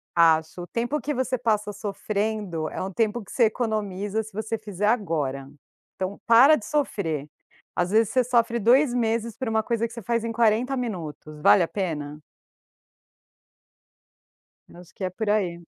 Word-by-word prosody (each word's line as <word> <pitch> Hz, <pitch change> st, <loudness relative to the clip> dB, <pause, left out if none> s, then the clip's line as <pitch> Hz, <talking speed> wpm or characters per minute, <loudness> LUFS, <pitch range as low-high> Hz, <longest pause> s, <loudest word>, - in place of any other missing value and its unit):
Acho. 165 Hz, 0 st, +3 dB
O -, -, -7 dB
tempo 240 Hz, +9 st, -2 dB
que 295 Hz, -, -2 dB
você 255 Hz, 0 st, -1 dB
passa 215 Hz, -3 st, 0 dB
sofrendo 205 Hz, -4 st, -3 dB
é -, -, -5 dB
um 190 Hz, +1 st, -4 dB
tempo 220 Hz, +2 st, 0 dB
que -, -, -12 dB
você 240 Hz, -, +3 dB
economiza, 215 Hz, -2 st, -1 dB
se 220 Hz, -, -12 dB
você 220 Hz, +2 st, -3 dB
fizer 205 Hz, -2 st, -3 dB
agora. 150 Hz, -, -1 dB, 0.5 s
Então, 190 Hz, +1 st, -4 dB
para 245 Hz, +6 st, +7 dB
de 210 Hz, -, -7 dB
sofrer! 170 Hz, -, -1 dB, 0.5 s
Às 175 Hz, 0 st, 0 dB
vezes 220 Hz, 0 st, +3 dB
você 255 Hz, -, +3 dB
sofre 235 Hz, -1 st, +1 dB
2 245 Hz, +5 st, +4 dB
meses 230 Hz, -1 st, 0 dB
por 260 Hz, -, -3 dB
uma 220 Hz, 0 st, +1 dB
coisa 230 Hz, 0 st, -1 dB
que 230 Hz, -, -12 dB
você 235 Hz, -, -7 dB
faz 230 Hz, +3 st, -1 dB
em 230 Hz, -, -2 dB
40 235 Hz, +3 st, +2 dB
minutos. 160 Hz, -, -5 dB
Vale 180 Hz, -, +6 dB
a 165 Hz, -, 0 dB
pena? 150 Hz, -6 st, -4 dB, 2.5 s
Eu -, -, -16 dB
acho 180 Hz, +1 st, -16 dB
que 190 Hz, -, -5 dB
é 185 Hz, -, -1 dB
por 215 Hz, +4 st, -4 dB
aí. 180 Hz, -5 st, 0 dB
215 Hz, 170 wpm, -25 LUFS, 180-235 Hz, 2.5 s, para